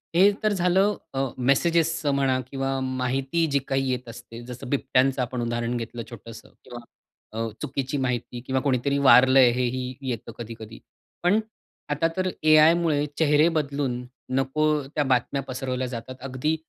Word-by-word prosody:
हे 195 +4 +6
तर 215 -1 +2
झालं 190 +2 +2 0.2
अ, 135 - -2 0.2
मेसेजेसचं 160 +3 +2
म्हणा 135 -2 +1
किंवा 135 0 -2
माहिती 130 +5 -1
जी 140 - +3
काही 135 -1 0
येत 125 -1 -4
असते, 115 0 -10
जसं 125 0 -8
बिबट्यांचं 130 -1 +1
आपण 125 0 -3
उदाहरण 120 +1 -2
घेतलं 115 0 -6
छोटंसं. 115 -1 -11
किंवा 120 -1 -9 0.6
अ, 115 - -1
चुकीची 135 +1 -3
माहिती 125 -2 -2
किंवा 130 0 0
कोणीतरी 140 +1 0
वारलंय, 130 -1 +6
हे 125 +1 -1
ही 130 0 -4
येतं 120 -1 -5
कधी-कधी. 115 -1 -9 0.4
पण 200 +5 +4 0.5
आता 150 +3 +1
तर 185 0 +1
एआयमुळे 155 -1 +5
चेहरे 150 0 +4
बदलून 140 -4 -2 0.3
नको 135 +3 0 0.2
त्या 150 +1 -1
बातम्या 130 +1 0
पसरवल्या 130 0 -3
जातात. 125 +1 -7
अगदी 135 +4 -1
135 Hz, 145 wpm, -25 LUFS, 125-150 Hz, 0.6 s, हे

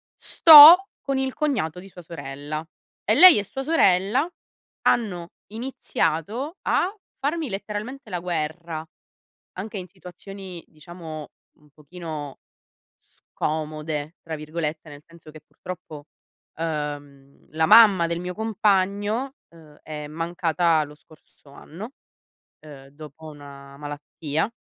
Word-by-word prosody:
sto 330 +5 +9
con 275 -1 -2
il 265 -1 -2
cognato 250 - -2
di 195 +2 -13
sua 180 - -13
sorella, 155 -1 -7 0.4
e - - +2
lei 365 - +9
e - - -3
sua 270 +7 -6
sorella 255 - +2 0.5
hanno 180 -7 0 0.2
iniziato 230 - -3
a 375 - 0 0.3
farmi 300 +1 -2
letteralmente 210 +7 -6
la 180 - -2
guerra, 165 -1 -4 0.7
anche 205 +3 -6
in 180 - -8
situazioni, 185 0 -11
diciamo 155 -1 -10 0.3
un 150 -2 -25
pochino 150 -1 -9 0.6
"scomode" 155 0 -5
tra 160 -1 -6
virgolette, 155 0 -5
nel 145 0 -13
senso 165 -2 -16
che 155 - -13
purtroppo, 155 -5 -10 0.5
uhm, 145 -3 -6
la 160 +1 +1
mamma 205 -4 +7
del 170 0 -3
mio 180 +1 -5
compagno, 210 +4 0 0.2
uhm, 155 -3 -18
è 150 -1 -7
mancata 165 0 0
lo 150 0 -11
scorso 150 -2 -22
anno, 185 - -10 0.7
uhm, 145 -3 -13
dopo 155 +2 -13
una 140 -2 -12
malattia. 145 +3 -4
170 Hz, 115 wpm, -23 LUFS, 150-205 Hz, 0.7 s, sto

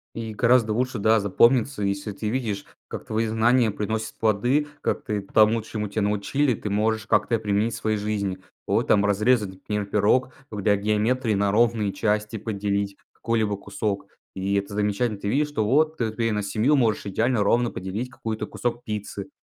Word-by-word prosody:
И 115 -1 -5
гораздо 115 0 +3
лучше, 125 0 -1
да, 110 +2 +4
запомнится 115 +4 +3
если 100 +1 -2
ты 105 +2 -4
видишь, 110 -5 -2 0.2
как - - -7
твои 110 +1 -1
знания 115 +1 +3
приносят 110 +2 -3
плоды, 120 +7 +2
как - - -1
ты 105 -3 -2
тому 110 +3 +3
чему 105 -1 -4
тя 110 +2 -2
научили, 105 +7 +1
ты 105 - -5
можешь 110 +1 0
как-то 115 - +2
и - - +2
применить 105 +2 0
в - - -4
своей 110 -1 -1
жизни. 100 -3 -2 0.3
Вот - - +1
там 100 -1 +4
разрезать, 105 +1 +2
например, 105 +2 -4
пирог, 105 +6 +2 0.2
в 105 -2 -5
для 100 +1 +3
геометрии 110 +4 +1
на 100 0 +1
ровные 110 -2 +2
части 105 0 -1
поделить 100 -2 -2 0.2
какой-либо 110 -3 -1
кусок. 100 0 -3 0.3
И 95 +1 -1
это 100 0 -2
замечательно. 105 +1 0
Ты 100 - -3
видишь, 145 +6 +1
что 110 -8 -1
вот 155 +7 +2
ты 115 -4 -1
ты 115 +1 -1
и - - -1
на 105 -1 -1
семью 110 +9 +2
можешь 115 -7 +1
идеально 110 +3 +1
ровно 120 +3 +2
поделить 95 +7 -4
какую-то 110 -3 -4
кусок 120 0 -3
пиццы, 105 -2 -5
110 Hz, 185 wpm, -24 LUFS, 100-115 Hz, 0.3 s, да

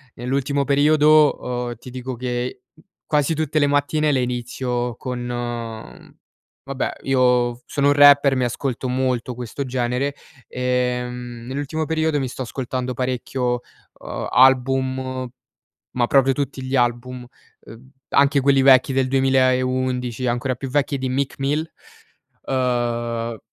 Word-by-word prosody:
Nell'ultimo 140 +3 -1
periodo, 145 -3 +3
uhm, 120 - -5
ti 125 +3 -12
dico 130 0 -5
che 125 +1 -4 0.2
i - - -21 0.2
quasi 150 +1 +1
tutte 155 0 0
le 145 - +3
mattine 145 +2 +1
le 130 -2 +1
inizio 125 0 -3
con, 125 0 -5
mhmm, 120 -2 -6 0.5
vabbè 135 -1 -3
io 125 -2 +2
v 120 - -16
sono 140 0 +1
un 145 - +5
rapper, 145 -1 +6
mi 125 - +1
ascolto 125 +1 -3
molto 125 -1 -1
questo 125 +3 -5
genere, 125 +2 -1 0.3
ehm, 125 -1 -2
nell'ultimo 145 +4 -3
periodo 160 -1 0
mi 135 - -2
sto 130 - -7
ascoltando 125 0 -4
parecchio, 125 0 -2 0.4
uhm, - - -5
album 130 0 +2 0.7
ma 120 -1 +2
proprio 135 -1 +4
tutti 140 -1 -3
gli 130 +1 -2
album, 120 0 -1 0.3
uhm, 125 +4 -15 0.2
anche 140 +1 +4
quelli 135 0 +3
vecchi 135 0 +5
del 130 0 +1
2011 130 -2 +1
e - - +1
ancora 120 +2 -1
più 135 +2 -6
vecchi 140 0 0
di 130 - -2
Meek 135 +1 -2
Mill. 145 +4 -1 0.8
Uhm, 120 -3 -1
130 Hz, 140 wpm, -21 LUFS, 125-140 Hz, 0.8 s, rapper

